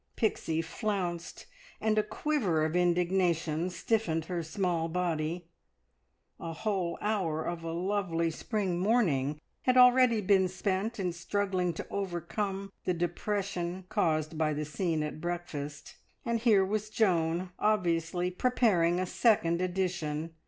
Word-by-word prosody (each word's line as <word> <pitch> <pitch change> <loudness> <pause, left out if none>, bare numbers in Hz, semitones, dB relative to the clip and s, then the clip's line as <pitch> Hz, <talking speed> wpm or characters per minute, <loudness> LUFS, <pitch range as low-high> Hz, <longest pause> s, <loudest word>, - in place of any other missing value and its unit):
Pixie 165 -7 0
flounced, 175 -2 -3 0.3
and 220 -1 +1
a 215 - +4
quiver 210 - 0
of 160 +2 -2
indignation 175 -2 +1
stiffened 175 -3 0
her 175 0 -2
small 165 0 -1
body. 170 -1 -1 0.9
A 165 - -5
whole 185 -1 -1
hour 185 -7 0
of 170 -1 -4
a 165 - -3
lovely 170 -2 0
spring 190 0 -2
morning 160 - +2 0.2
had 255 0 +2
already 250 -2 +6
been 190 -2 +3
spent 195 +4 -2
in 180 -3 -1
struggling 185 0 -1
to - - -6
overcome 195 +1 -3
the 180 - 0
depression 180 +1 -2
caused 155 -5 0
by 155 -1 +1
the 150 +1 -2
scene 160 0 -1
at 150 +1 -5
breakfast, 165 -5 -5 0.3
and 235 -1 0
here 215 -5 +4
was 215 +2 -2
Joan 180 -4 +1
obviously 175 -4 +1
preparing 180 -6 +2
a 185 - 0
second 180 -4 +2
edition. 175 -4 -2
180 Hz, 130 wpm, -30 LUFS, 165-205 Hz, 0.9 s, already